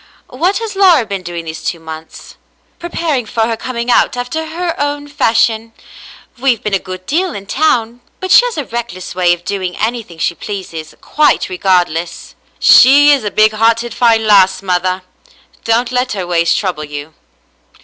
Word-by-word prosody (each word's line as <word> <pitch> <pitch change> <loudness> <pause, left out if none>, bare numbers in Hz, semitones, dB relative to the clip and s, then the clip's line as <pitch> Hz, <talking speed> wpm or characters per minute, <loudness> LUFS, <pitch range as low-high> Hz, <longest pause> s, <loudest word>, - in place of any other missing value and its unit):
What 350 +10 0
has 450 -3 -5
Laura 360 - +4
been 200 -2 -5
doing 170 -2 -6
these 160 -1 -7
two 170 - -3
months? 160 0 -10 0.2
" - - -41
"Preparing 325 -8 -2
for 230 +1 -2
her 225 +1 +1
coming 235 +1 -3
out 245 - +2
after 315 +6 -4
her 335 +1 -3
own 290 0 -2
fashion. 230 -5 0 0.7
We've 250 -4 +1
been 210 - -3
a 195 - +2
good 185 0 -9
deal 350 - -1
in 200 - -7
town, 240 -2 0 0.2
but 375 - -4
she - - +8
has 485 -8 -4
a 295 - -3
reckless 235 -6 -6
way 180 -1 +2
of 175 0 -2
doing 185 -3 -3
anything 220 -6 -3
she 165 - -1
pleases, 170 -5 -7
quite 300 -1 +1
regardless." 180 -3 -1 0.2
"She 285 +3 +7
is 280 -4 +2
a 210 - -1
big 215 +2 +3
hearted 230 +1 +1
fine 225 -2 +2
lass, 190 -2 +4
mother. 185 0 -1 0.6
Don't 235 +2 +1
let 250 -1 -1
her 190 -3 -4
ways 170 -1 +1
trouble 180 -6 -2
you." 145 +1 -8
225 Hz, 175 wpm, -14 LUFS, 185-260 Hz, 0.7 s, she